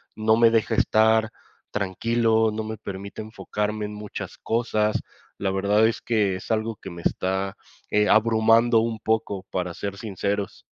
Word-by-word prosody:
no 110 Hz, 0 st, +3 dB
me 115 Hz, -1 st, +6 dB
deja 115 Hz, -1 st, +1 dB
estar 110 Hz, 0 st, +3 dB, 0.4 s
tranquilo. 110 Hz, +3 st, +1 dB
No 110 Hz, +1 st, -3 dB
me 110 Hz, 0 st, -5 dB
permite 100 Hz, +1 st, -7 dB
enfocarme 105 Hz, -1 st, -3 dB
en 105 Hz, -, -6 dB
muchas 105 Hz, 0 st, -7 dB
cosas. 110 Hz, -2 st, 0 dB, 0.4 s
La 95 Hz, -1 st, -1 dB
verdad 100 Hz, +3 st, +3 dB
es 115 Hz, -, +1 dB
que 105 Hz, -5 st, +1 dB
es 95 Hz, -, -11 dB
algo 110 Hz, -1 st, -1 dB
que 95 Hz, -, -9 dB
me 85 Hz, 0 st, -9 dB
está, 95 Hz, +2 st, -1 dB, 0.3 s
eh, 105 Hz, 0 st, +3 dB
abrumando, 115 Hz, +1 st, +4 dB
un 115 Hz, 0 st, -1 dB
poco, 110 Hz, -4 st, -1 dB
para 90 Hz, -1 st, -2 dB
ser 100 Hz, +2 st, -5 dB
sinceros. 100 Hz, -1 st, -3 dB
110 Hz, 155 wpm, -24 LUFS, 100-110 Hz, 0.4 s, me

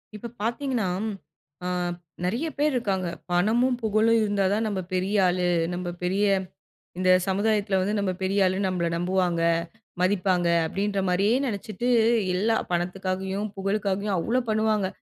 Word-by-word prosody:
இப்ப 235 Hz, +3 st, -7 dB
பார்த்தீங்கன்னா, 235 Hz, -1 st, -1 dB, 0.8 s
ஆ -, -, -1 dB, 0.6 s
நெறைய 235 Hz, -, -1 dB
பேர் 295 Hz, 0 st, +2 dB
இருக்காங்க. 195 Hz, -7 st, -1 dB, 0.2 s
பணமும், 235 Hz, +8 st, +2 dB
புகழும் 220 Hz, +1 st, +3 dB
இருந்தா 205 Hz, -2 st, +1 dB
தான் 220 Hz, +2 st, 0 dB
நம்ம 200 Hz, -3 st, -2 dB
பெரிய 185 Hz, +3 st, 0 dB
ஆளு. 180 Hz, 0 st, 0 dB, 0.3 s
நம்ம 180 Hz, 0 st, -4 dB, 0.2 s
பெரிய 190 Hz, +3 st, +1 dB, 0.7 s
இந்த 185 Hz, 0 st, +4 dB, 0.2 s
சமுதாயத்தில 205 Hz, 0 st, +1 dB
வந்து 200 Hz, +3 st, -1 dB
"நம்ம 200 Hz, -2 st, 0 dB
பெரிய 195 Hz, +2 st, +1 dB
ஆளுன்னு 190 Hz, +1 st, +1 dB
நம்மளை 175 Hz, -2 st, -1 dB
நம்புவாங்க, 180 Hz, -1 st, 0 dB, 0.6 s
மதிப்பாங்க" 185 Hz, -2 st, +2 dB, 0.2 s
அப்டின்ற 200 Hz, +4 st, -1 dB
மாரியே 200 Hz, +6 st, +2 dB
நெனைச்சிட்டு, 215 Hz, 0 st, -3 dB, 0.5 s
எல்லா 220 Hz, +5 st, +2 dB, 0.2 s
பணத்துக்காகயும், 190 Hz, +3 st, -2 dB
புகழுக்காகயும் 200 Hz, 0 st, -1 dB
அவ்ளோ 235 Hz, +9 st, +1 dB
பண்ணுவாங்க. 215 Hz, -2 st, +1 dB
200 Hz, 130 wpm, -25 LUFS, 185-215 Hz, 0.8 s, இந்த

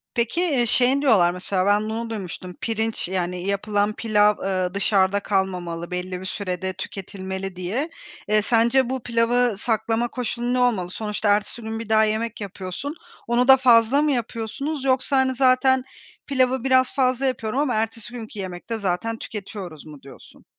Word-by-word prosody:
Peki, 235 Hz, +8 st, 0 dB
eee, 280 Hz, -9 st, +2 dB
şeyin 255 Hz, +4 st, +3 dB
diyorlar 200 Hz, -11 st, +4 dB
mesela 185 Hz, +1 st, -1 dB
ben 210 Hz, +1 st, +2 dB
bunu 230 Hz, +1 st, -3 dB
duymuştum: 185 Hz, -4 st, -6 dB
Pirinç, 225 Hz, -2 st, -2 dB
yani 180 Hz, 0 st, -2 dB
yapılan 205 Hz, +1 st, 0 dB
pilav, 210 Hz, -2 st, +3 dB
ııı, 185 Hz, -2 st, -1 dB
dışarıda 200 Hz, 0 st, +2 dB
kalmamalı 180 Hz, -4 st, -2 dB
belli 180 Hz, 0 st, -4 dB
bir -, -, -8 dB
sürede 185 Hz, -1 st, -3 dB
tüketilmeli 190 Hz, -1 st, -6 dB
diye. 210 Hz, -, -2 dB, 0.4 s
Eee, 215 Hz, 0 st, +3 dB
sence 235 Hz, +3 st, +3 dB
bu 260 Hz, -2 st, -3 dB
pilavı 235 Hz, -1 st, +2 dB
saklama 225 Hz, +1 st, 0 dB
koşulu 240 Hz, 0 st, -3 dB
ne 255 Hz, -, +1 dB
olmalı? 215 Hz, -8 st, +1 dB
Sonuçta 210 Hz, +1 st, -2 dB
ertesi 210 Hz, +3 st, -2 dB
gün 220 Hz, 0 st, -4 dB
bir 225 Hz, -1 st, -7 dB
daha 220 Hz, 0 st, +5 dB
yemek 220 Hz, +1 st, -1 dB
yapıyorsun. 200 Hz, -, -5 dB, 0.3 s
Onu 240 Hz, +1 st, +2 dB
da 265 Hz, 0 st, +9 dB
fazla 250 Hz, +1 st, +5 dB
mı 300 Hz, -1 st, +2 dB
yapıyorsunuz 260 Hz, +4 st, -3 dB
yoksa 265 Hz, +1 st, +2 dB
hani, 260 Hz, 0 st, +2 dB
"Zaten 260 Hz, 0 st, +4 dB, 0.4 s
pilavı 260 Hz, -2 st, +1 dB
biraz 260 Hz, -1 st, +3 dB
fazla 255 Hz, 0 st, +1 dB
yapıyorum 255 Hz, -1 st, -1 dB
ama 280 Hz, -5 st, +1 dB
ertesi 225 Hz, +2 st, -3 dB
günkü 220 Hz, -3 st, -8 dB
yemekte 190 Hz, +4 st, -5 dB
zaten 205 Hz, +3 st, -2 dB
tüketiyoruz." 195 Hz, -6 st, -7 dB
mu 150 Hz, -3 st, -12 dB
diyorsun? 135 Hz, -, -15 dB
220 Hz, 160 wpm, -23 LUFS, 190-250 Hz, 0.4 s, da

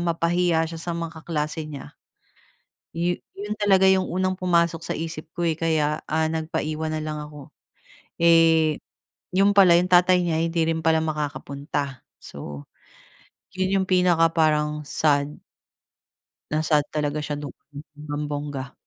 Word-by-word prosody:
mapahiya 170 Hz, 0 st, +1 dB
siya 165 Hz, -, -7 dB
sa 170 Hz, 0 st, -3 dB
mga 165 Hz, -1 st, -6 dB
kaklase 155 Hz, -1 st, -3 dB
niya. 140 Hz, -, -9 dB, 1.0 s
Yo 175 Hz, +1 st, +1 dB, 0.2 s
'yon 210 Hz, +1 st, -4 dB
talaga 195 Hz, -2 st, +4 dB
'yong 190 Hz, -1 st, +3 dB
unang 185 Hz, +1 st, 0 dB
pumasok 170 Hz, -3 st, +1 dB
sa -, -, -4 dB
isip 160 Hz, -1 st, -6 dB
ko, 175 Hz, -, 0 dB
eh, 165 Hz, -, +2 dB
kaya 155 Hz, -2 st, 0 dB
nagpaiwan 160 Hz, 0 st, -1 dB
na 155 Hz, 0 st, -2 dB
lang 150 Hz, -1 st, -4 dB
ako. 150 Hz, -2 st, -11 dB, 0.6 s
Eh, 165 Hz, -2 st, +4 dB, 0.5 s
'yon 200 Hz, +2 st, +3 dB
pala, 185 Hz, -3 st, +7 dB
'yong 175 Hz, +1 st, +4 dB
tatay 180 Hz, 0 st, +5 dB
niya 170 Hz, -2 st, 0 dB
hindi 165 Hz, 0 st, 0 dB
rin 160 Hz, -1 st, -1 dB
pala 160 Hz, 0 st, +3 dB
makakapunta. 145 Hz, -3 st, -4 dB, 0.2 s
So 70 Hz, 0 st, -9 dB, 0.9 s
'yon 185 Hz, 0 st, 0 dB
'yong 190 Hz, -, -1 dB
pinaka 180 Hz, -3 st, +4 dB
parang 150 Hz, -1 st, +1 dB
sad. 145 Hz, 0 st, 0 dB, 1.1 s
Na-sad 155 Hz, -1 st, +2 dB
talaga 150 Hz, 0 st, -2 dB
siya 150 Hz, -1 st, -4 dB
doon 145 Hz, -1 st, -7 dB, 0.4 s
bonggang-bongga. 145 Hz, -2 st, -5 dB
160 Hz, 135 wpm, -24 LUFS, 150-170 Hz, 1.1 s, pala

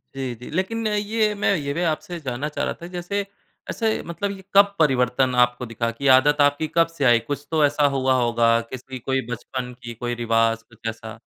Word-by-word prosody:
जी, 130 Hz, -2 st, -3 dB
जी। 120 Hz, +2 st, -11 dB
लेकिन 205 Hz, +7 st, -2 dB
अ, -, -, -1 dB
ये 210 Hz, +1 st, +1 dB
मैं 200 Hz, 0 st, +1 dB
ये 140 Hz, -3 st, -3 dB
भी 170 Hz, -, -2 dB
आपसे 170 Hz, +3 st, -5 dB
जानना 130 Hz, -1 st, -3 dB
चाह -, -, -2 dB
रहा -, -, -2 dB
था, 170 Hz, -, -7 dB
जैसे 200 Hz, +3 st, -2 dB, 0.4 s
ऐसे 225 Hz, -2 st, -1 dB
मतलब 185 Hz, +4 st, -3 dB
ये 190 Hz, -1 st, -9 dB
कब 200 Hz, 0 st, +5 dB
परिवर्तन 130 Hz, -3 st, +2 dB
आपको 125 Hz, +1 st, -2 dB
दिखा 115 Hz, 0 st, -2 dB
कि 140 Hz, -, -1 dB
आदत 145 Hz, +2 st, +3 dB
आपकी 145 Hz, +2 st, +2 dB
कब 165 Hz, -1 st, +5 dB
से 140 Hz, -, +1 dB
आई। 120 Hz, -1 st, +6 dB
कुछ 145 Hz, 0 st, -4 dB
तो 155 Hz, -2 st, +4 dB
ऐसा 145 Hz, +1 st, +2 dB
हुआ 130 Hz, 0 st, +2 dB
होगा, 115 Hz, -1 st, +3 dB
किसी 130 Hz, 0 st, -7 dB
कोई 135 Hz, +2 st, -1 dB
बचपन 125 Hz, +1 st, -5 dB
की 120 Hz, 0 st, -6 dB
कोई 120 Hz, +1 st, -4 dB
रिवाज़ 115 Hz, 0 st, +2 dB
कुछ 115 Hz, 0 st, -9 dB
ऐसा? 110 Hz, 0 st, -9 dB
135 Hz, 210 wpm, -23 LUFS, 120-170 Hz, 0.4 s, आई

